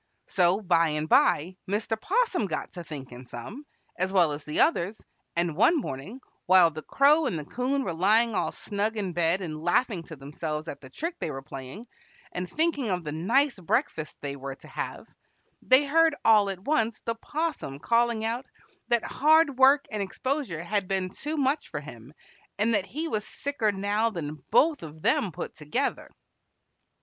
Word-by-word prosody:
So 185 Hz, +2 st, +2 dB
by 170 Hz, -4 st, +3 dB
and 150 Hz, 0 st, -2 dB
by 175 Hz, +4 st, +3 dB
Mr. 215 Hz, +2 st, -1 dB
'Possum 430 Hz, -, +1 dB
got 155 Hz, -, -4 dB
to 175 Hz, -, -8 dB
thinking 130 Hz, -5 st, -9 dB
some, 230 Hz, -, -9 dB, 0.3 s
as 185 Hz, +1 st, 0 dB
well 175 Hz, -5 st, +4 dB
as 145 Hz, 0 st, -5 dB
the 150 Hz, -, -3 dB
others, 215 Hz, -, +1 dB, 0.4 s
and 170 Hz, -2 st, 0 dB
one 235 Hz, -, +4 dB
morning, 200 Hz, -, -6 dB, 0.3 s
while 180 Hz, -2 st, +6 dB
the 155 Hz, 0 st, -7 dB
Crow 290 Hz, -, +4 dB
and 185 Hz, -, -2 dB
the 150 Hz, -, -6 dB
'Coon 265 Hz, -, -1 dB
were 175 Hz, -, -3 dB
lying 215 Hz, +7 st, +3 dB
all -, -, 0 dB
snug 210 Hz, +2 st, -2 dB
in 195 Hz, -4 st, -2 dB
bed 170 Hz, +2 st, +2 dB
and 155 Hz, -4 st, -5 dB
laughing 185 Hz, +2 st, +1 dB
to 160 Hz, -, -9 dB
themselves 150 Hz, +3 st, -5 dB
at 140 Hz, -2 st, -7 dB
the 130 Hz, -, -12 dB
trick 335 Hz, -, -5 dB
they -, -, -2 dB
were 135 Hz, -2 st, -6 dB
playing, 135 Hz, -, -8 dB, 0.5 s
and 180 Hz, 0 st, -4 dB
thinking 305 Hz, -7 st, 0 dB
of 180 Hz, -2 st, -1 dB
the 150 Hz, -, -4 dB
nice 230 Hz, -, +1 dB
breakfast 185 Hz, -, -1 dB
they 140 Hz, -1 st, -4 dB
were 135 Hz, 0 st, -6 dB
to -, -, -16 dB
have, -, -, -5 dB, 0.5 s
they 260 Hz, +3 st, +5 dB
heard 320 Hz, +2 st, +4 dB
all 210 Hz, -3 st, +6 dB
at 190 Hz, -2 st, -4 dB
once 230 Hz, -7 st, +1 dB
the 230 Hz, -, -2 dB
'Possum 295 Hz, -, -4 dB
calling 230 Hz, +5 st, +1 dB
out 240 Hz, +4 st, -2 dB, 0.4 s
that 235 Hz, -1 st, +2 dB
hard 305 Hz, -2 st, +3 dB
work 275 Hz, +2 st, +6 dB
and 210 Hz, -1 st, -2 dB
exposure 220 Hz, -, -3 dB
had 200 Hz, +1 st, -1 dB
been 190 Hz, -1 st, -1 dB
too 300 Hz, +8 st, -4 dB
much 285 Hz, +1 st, 0 dB
for -, -, -4 dB
him, 125 Hz, -3 st, -11 dB, 0.5 s
and 220 Hz, +3 st, +2 dB
that 200 Hz, -2 st, +1 dB
he 315 Hz, +4 st, -3 dB
was 215 Hz, -9 st, -2 dB
sicker 275 Hz, -6 st, -2 dB
now 205 Hz, +3 st, 0 dB
than 155 Hz, -8 st, -6 dB
both 310 Hz, -1 st, +4 dB
of 155 Hz, -1 st, -10 dB
them 195 Hz, -, +2 dB
put -, -, -6 dB
together. 155 Hz, -, -2 dB
200 Hz, 180 wpm, -27 LUFS, 160-260 Hz, 0.5 s, while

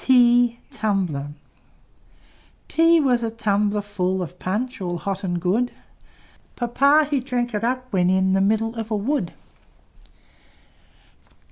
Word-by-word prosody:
T 245 Hz, -2 st, +4 dB, 2.1 s
T 330 Hz, +1 st, +4 dB
was 250 Hz, -4 st, +2 dB
a 230 Hz, -, -1 dB
tumbler 210 Hz, -2 st, 0 dB
full 190 Hz, -2 st, -2 dB
Of 180 Hz, +1 st, -10 dB
Punch 235 Hz, +6 st, -3 dB
all 175 Hz, -1 st, -3 dB
hot 195 Hz, +3 st, -4 dB
and 175 Hz, -2 st, -2 dB
good; 210 Hz, +8 st, 0 dB, 0.8 s
Papa 280 Hz, +5 st, +3 dB
he 285 Hz, -2 st, 0 dB
drank 245 Hz, -2 st, -2 dB
it 210 Hz, +1 st, -2 dB
up, 255 Hz, +2 st, -1 dB
when 180 Hz, -1 st, +2 dB
in 190 Hz, 0 st, +2 dB
The 195 Hz, -, +2 dB
middle 220 Hz, +3 st, +1 dB
of 225 Hz, -1 st, -4 dB
a 220 Hz, -, 0 dB
wood. 210 Hz, -, -1 dB
225 Hz, 125 wpm, -22 LUFS, 190-250 Hz, 2.1 s, T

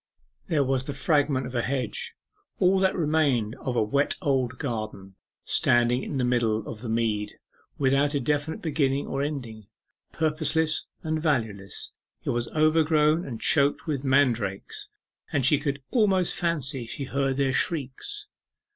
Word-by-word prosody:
There 155 Hz, -5 st, +2 dB
was 130 Hz, -1 st, 0 dB
the 145 Hz, -, -5 dB
fragment 140 Hz, -2 st, +2 dB
of 125 Hz, -, -7 dB
a 120 Hz, -, +1 dB
hedge 125 Hz, -3 st, -3 dB, 0.4 s
all 185 Hz, +1 st, +4 dB
that 190 Hz, 0 st, +2 dB
remained 145 Hz, -, +1 dB
of 125 Hz, -, -3 dB
a 115 Hz, -, +3 dB
'wet 140 Hz, +7 st, +1 dB
old 130 Hz, -6 st, 0 dB
garden' 110 Hz, -7 st, -5 dB, 0.3 s
standing 120 Hz, +1 st, +3 dB
in 140 Hz, -, -4 dB
the 130 Hz, -, +1 dB
middle 115 Hz, -3 st, +1 dB
of 110 Hz, -, -7 dB
the 120 Hz, -, -5 dB
mead, 110 Hz, -2 st, -1 dB, 0.4 s
without 140 Hz, +2 st, +2 dB
a -, -, +2 dB
definite 145 Hz, +4 st, -1 dB
beginning 140 Hz, -3 st, +1 dB
or 135 Hz, -, -2 dB
ending, 120 Hz, -8 st, -5 dB, 0.4 s
purposeless 155 Hz, 0 st, 0 dB, 0.2 s
and 155 Hz, 0 st, -1 dB
valueless. 110 Hz, -, -2 dB, 0.3 s
It -, -, -1 dB
was 120 Hz, 0 st, -1 dB
overgrown, 155 Hz, +1 st, +3 dB
and 120 Hz, -4 st, -5 dB
choked 140 Hz, 0 st, +3 dB
with 145 Hz, -4 st, -2 dB
mandrakes, 120 Hz, -8 st, +1 dB, 0.4 s
and 135 Hz, -4 st, +1 dB
she 140 Hz, +2 st, +4 dB
could 140 Hz, -2 st, -3 dB
almost 195 Hz, -7 st, +3 dB
fancy 140 Hz, -8 st, -2 dB
she 140 Hz, -, -4 dB
heard 135 Hz, 0 st, -1 dB
their 135 Hz, -2 st, +1 dB
shrieks.... 160 Hz, -, -2 dB
140 Hz, 150 wpm, -26 LUFS, 120-155 Hz, 0.4 s, all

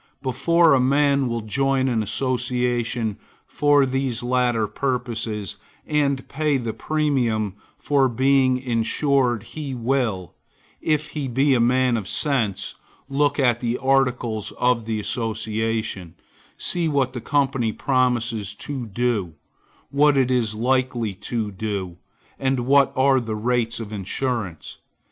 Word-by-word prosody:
Before 160 Hz, +5 st, +3 dB
a 135 Hz, -, +4 dB
man 140 Hz, +1 st, +3 dB
will 115 Hz, -1 st, -2 dB
join 135 Hz, +4 st, +1 dB
an 120 Hz, -4 st, +1 dB
association 125 Hz, -1 st, -1 dB, 0.3 s
for 145 Hz, -1 st, +3 dB
these 130 Hz, -2 st, -2 dB
latter 120 Hz, -2 st, +1 dB
purposes, 115 Hz, -3 st, -3 dB, 0.3 s
and 140 Hz, -3 st, 0 dB
pay 150 Hz, -1 st, 0 dB
the 115 Hz, -3 st, -3 dB
premium 120 Hz, -7 st, 0 dB, 0.2 s
for 135 Hz, -2 st, +2 dB
being 130 Hz, +1 st, +3 dB
insured, 125 Hz, 0 st, +1 dB
he 140 Hz, 0 st, -6 dB
will, 115 Hz, -, -1 dB, 0.5 s
if 155 Hz, -1 st, 0 dB
he 145 Hz, -3 st, -4 dB
be 135 Hz, +3 st, +2 dB
a 125 Hz, -, +3 dB
man 125 Hz, 0 st, +3 dB
of 100 Hz, -4 st, -5 dB
sense, 120 Hz, -6 st, -1 dB, 0.4 s
look 145 Hz, +1 st, +1 dB
at 120 Hz, -4 st, +3 dB
the 120 Hz, 0 st, -1 dB
articles 125 Hz, -5 st, 0 dB
of 125 Hz, -2 st, +1 dB
the 110 Hz, -1 st, -2 dB
association; 110 Hz, -4 st, -2 dB, 0.4 s
see 175 Hz, -2 st, 0 dB
what 135 Hz, -4 st, +1 dB
the 120 Hz, -, -5 dB
company 135 Hz, -5 st, +1 dB
promises 120 Hz, -5 st, 0 dB
to 130 Hz, 0 st, -5 dB
do; 105 Hz, -6 st, -1 dB, 0.6 s
what 145 Hz, 0 st, +4 dB
it 130 Hz, -1 st, +2 dB
is 115 Hz, -4 st, +1 dB
likely 125 Hz, -2 st, 0 dB
to 105 Hz, +2 st, -4 dB
do; 95 Hz, -3 st, -4 dB, 0.4 s
and 135 Hz, -1 st, 0 dB
what 140 Hz, +2 st, +4 dB
are 135 Hz, 0 st, +4 dB
the 115 Hz, -3 st, -4 dB
rates 115 Hz, +1 st, 0 dB
of 110 Hz, -2 st, -7 dB
insurance. 100 Hz, -, -4 dB
125 Hz, 130 wpm, -23 LUFS, 110-135 Hz, 0.6 s, a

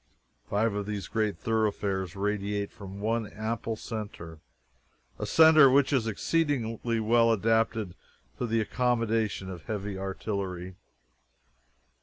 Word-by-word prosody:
Five 105 Hz, +1 st, +1 dB
of 100 Hz, 0 st, -3 dB
these 100 Hz, -4 st, -4 dB
great 110 Hz, -4 st, -1 dB
thoroughfares 100 Hz, -3 st, -1 dB
radiate 100 Hz, 0 st, -2 dB
from 100 Hz, -2 st, -9 dB
one 110 Hz, +1 st, 0 dB
ample 110 Hz, +2 st, -3 dB
centre 105 Hz, -8 st, -7 dB, 0.8 s
a -, -, -3 dB
centre 160 Hz, -3 st, +7 dB
which 140 Hz, +2 st, +3 dB
is 120 Hz, -5 st, +2 dB
exceedingly 115 Hz, -3 st, 0 dB
well 115 Hz, +1 st, +4 dB
adapted 110 Hz, -2 st, +1 dB, 0.5 s
to 125 Hz, -, -1 dB
the 115 Hz, 0 st, +1 dB
accommodation 115 Hz, -3 st, 0 dB
of 90 Hz, -4 st, -8 dB
heavy 100 Hz, -2 st, -4 dB
artillery. 95 Hz, -2 st, -4 dB
110 Hz, 115 wpm, -28 LUFS, 100-115 Hz, 0.8 s, centre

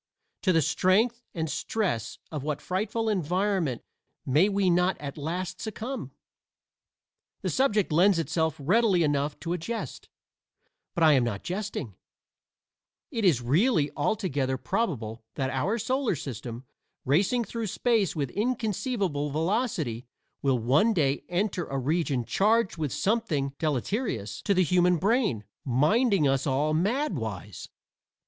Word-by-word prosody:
to 185 Hz, -, +3 dB
the 165 Hz, -3 st, +3 dB
strength 220 Hz, -, +2 dB
and 160 Hz, -1 st, -1 dB
stress 175 Hz, -, -2 dB
of 150 Hz, -3 st, -3 dB
what 150 Hz, +1 st, -2 dB
frightful 215 Hz, +4 st, -2 dB
environment 185 Hz, -, 0 dB, 0.4 s
may 155 Hz, +10 st, +4 dB
we 200 Hz, -1 st, +1 dB
not 180 Hz, +1 st, +3 dB
at 140 Hz, -1 st, -6 dB
last 180 Hz, +5 st, -4 dB
succumb? 230 Hz, +4 st, -5 dB, 1.3 s
The -, -, 0 dB
subject 215 Hz, -9 st, +2 dB
lends 180 Hz, +4 st, +5 dB
itself 160 Hz, -1 st, 0 dB
readily 185 Hz, +4 st, +3 dB
enough 145 Hz, -1 st, 0 dB
to 170 Hz, 0 st, -2 dB
a 180 Hz, -, -2 dB
jest, 225 Hz, +8 st, -5 dB, 0.9 s
but 170 Hz, -, +1 dB
I 155 Hz, -1 st, +7 dB
am 130 Hz, -3 st, +4 dB
not 110 Hz, -5 st, -3 dB
jesting: 185 Hz, -, -4 dB, 1.2 s
it 230 Hz, -, -2 dB
is 150 Hz, -11 st, +3 dB
really 150 Hz, -, +2 dB
altogether 145 Hz, -8 st, 0 dB
probable 125 Hz, -, -2 dB
that 135 Hz, -1 st, -1 dB
our 190 Hz, -, 0 dB
solar 255 Hz, -1 st, 0 dB
system, 125 Hz, -4 st, -6 dB, 0.4 s
racing 195 Hz, -, +2 dB
through 230 Hz, 0 st, -4 dB
space 220 Hz, -2 st, +1 dB
with 140 Hz, -5 st, -2 dB
inconceivable 210 Hz, -, -1 dB
velocity, 160 Hz, -, -1 dB, 0.3 s
will 135 Hz, -2 st, +2 dB
one 140 Hz, -, +3 dB
day 140 Hz, -4 st, +1 dB
enter 180 Hz, 0 st, -1 dB
a 135 Hz, -, -4 dB
region 140 Hz, -2 st, 0 dB
charged 215 Hz, -, +2 dB
with 155 Hz, -5 st, -2 dB
something 185 Hz, -11 st, 0 dB
deleterious 145 Hz, -, -2 dB
to 200 Hz, -, +3 dB
the 185 Hz, -, +4 dB
human 180 Hz, +1 st, +3 dB
brain, 205 Hz, -, +1 dB, 0.2 s
minding 155 Hz, -, +3 dB
us 135 Hz, +1 st, +1 dB
all 145 Hz, +3 st, +1 dB
mad 210 Hz, -, +1 dB
wise. 105 Hz, -, -6 dB
170 Hz, 135 wpm, -27 LUFS, 140-210 Hz, 1.3 s, I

